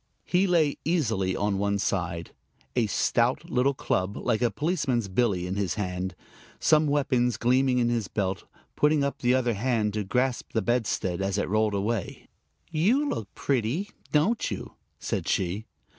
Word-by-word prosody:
He 185 +2 +2
lay 160 -5 +2
easily 110 - 0
on 100 -1 0
one 100 0 +1
side, 85 -4 -2 0.4
a 120 -3 +2
stout 125 - +1
little 135 +2 +2
club 95 -4 -1
like 110 - 0
a 120 - +3
policeman's 145 - 0
billy 95 -2 +1
in 95 +2 -3
his 100 -4 -1
hand, 95 -2 -3 0.4
some 155 -1 +4
weapons 130 -5 +1
gleaming 130 +1 +3
in 120 -1 +2
his 115 -4 -1
belt, 95 -3 -2 0.3
putting 150 -1 +3
up 140 - -2
the 125 +1 +3
other 125 -2 +1
hand 110 -1 0
to 105 -1 -1
grasp 125 +5 -1
the 110 - +1
bedstead 100 -6 0
as 95 0 -1
it 100 - 0
rolled 110 +1 +1
away. 105 0 -2 0.4
"You 220 - +2
look 110 - -3
pretty, 140 - -1 0.2
don't 190 +10 +2
you?" - - -6 0.2
said - - -3
she. 95 +4 -1
120 Hz, 160 wpm, -27 LUFS, 100-140 Hz, 0.4 s, some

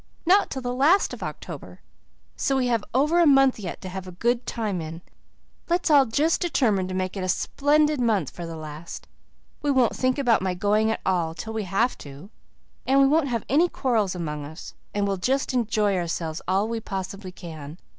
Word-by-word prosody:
"Not 385 +4 +4
till 265 - -5
the 245 0 -2
last 300 +10 +3
of - - -8
October. - - -7 0.6
So 270 -1 0
we 260 - +1
have 230 -3 +1
over 300 +7 +3
a 340 - +5
month 270 -3 +5
yet 190 -4 -6
to 185 - -6
have 190 0 -6
a - - -7
good 235 +7 -1
time 210 -6 -2
in. 165 +2 -7 0.7
Let's 345 -1 +1
all 280 -3 +6
just 300 +8 +1
determine 220 - +1
to 185 - -4
make 185 0 -2
it 190 - -3
a 185 - -2
splendid 295 +7 +2
month 210 - +1
for 170 -1 -7
the 165 - -6
last. 155 +1 -8 0.5
We 290 - -1
won't 260 -4 +3
think 255 +1 +1
about 245 -7 +3
my 185 -1 -1
going 210 +4 +2
at 225 - -2
all 170 -3 0
till 220 +5 -6
we 220 -2 -2
have 200 +7 0
to, 145 +8 -11 0.6
and 270 +1 +4
we 275 - +6
won't 300 +1 +3
have 235 -4 -2
any 325 +6 +3
quarrels 220 - 0
among 150 -4 -4
us, 155 +3 -9 0.2
and 205 -1 0
we'll 195 -1 -1
just 260 +8 0
enjoy 215 -4 +1
ourselves 165 -2 -3
all 195 +3 +1
we 230 0 -2
possibly 195 -2 -6
can. 160 -4 -9
215 Hz, 205 wpm, -25 LUFS, 180-265 Hz, 0.7 s, all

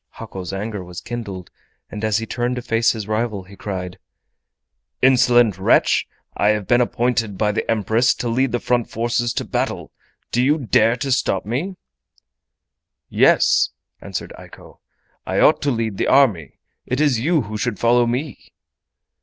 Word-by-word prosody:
Hako's 95 -2 -7
anger 100 0 -4
was 90 0 -8
kindled, 100 -7 -7 0.4
and 105 0 -7
as 110 -1 +1
he 115 - -3
turned 120 +2 -2
to 125 - -5
face 115 -1 +2
his 110 -3 -6
rival 110 -2 -2
he 95 +2 -15
cried: 90 -2 -6 1.0
"Insolent 120 -6 +4
wretch! 95 - +3 0.3
I 100 - +1
have 105 -2 0
been 120 +4 +3
appointed 120 -4 -1
by 105 +2 +1
the 105 - -3
Empress 115 +2 +2
to 125 - -4
lead 125 +2 +1
the 120 - -1
front 120 -1 0
forces 120 +1 -1
to - - -3
battle. - - -3 0.4
Do 120 - +1
you 145 +4 +3
dare 115 -3 +2
to 135 +2 -3
stop 95 -6 0
me?" 145 - -3 1.3
"Yes," - - +4 0.3
answered - - -6
Eiko. - - -15 0.5
"I - - 0
ought - - +4
to 145 - 0
lead 115 -5 -2
the - - 0
army. 110 - +2 0.3
It 130 - -1
is 145 -6 +2
you 155 +4 +1
who 110 0 -7
should 120 -2 -2
follow 120 +2 +3
me." 125 +2 -4
115 Hz, 160 wpm, -20 LUFS, 105-125 Hz, 1.3 s, Insolent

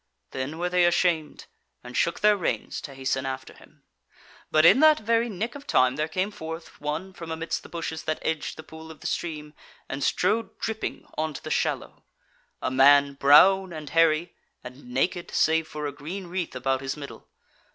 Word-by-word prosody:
Then 135 +4 -4
were 175 +1 -1
they 180 -1 +3
ashamed, 170 -3 +1 0.4
and 125 0 -10
shook 170 - 0
their 210 0 +5
reins 185 - -3
to 140 - -9
hasten 135 0 -1
after 130 0 -5
him. - - -20 0.7
But 155 +1 +4
in 200 +9 +7
that 310 0 +7
very 230 +2 +1
nick 220 +4 -3
of 285 0 -11
time 130 0 +3
there 155 +2 -1
came 185 +5 -2
forth 160 -2 -8
one 155 +6 -4
from 165 -2 -9
amidst 160 +1 -3
the - - -14
bushes 165 -1 -4
that 155 - -1
edged 160 -2 -2
the 160 - -9
pool 160 +1 -12
of 160 - -12
the - - -13
stream 150 -3 -4 0.3
and 135 +1 -4
strode 215 +3 0
dripping 220 -1 -4
on 155 -1 -2
to - - -8
the - - -6
shallow; - - -2 0.6
a - - 0
man 140 +2 +6
brown 180 +8 +6
and 155 -3 -8
hairy, 165 0 +3 0.3
and 125 +2 -11
naked, 135 +8 -1
save 160 0 +2
for 150 -1 -6
a 145 - -2
green 165 +7 -7
wreath 175 -4 -4
about 130 +1 -1
his 135 +2 -4
middle. 140 -1 -10
160 Hz, 190 wpm, -26 LUFS, 140-180 Hz, 0.7 s, in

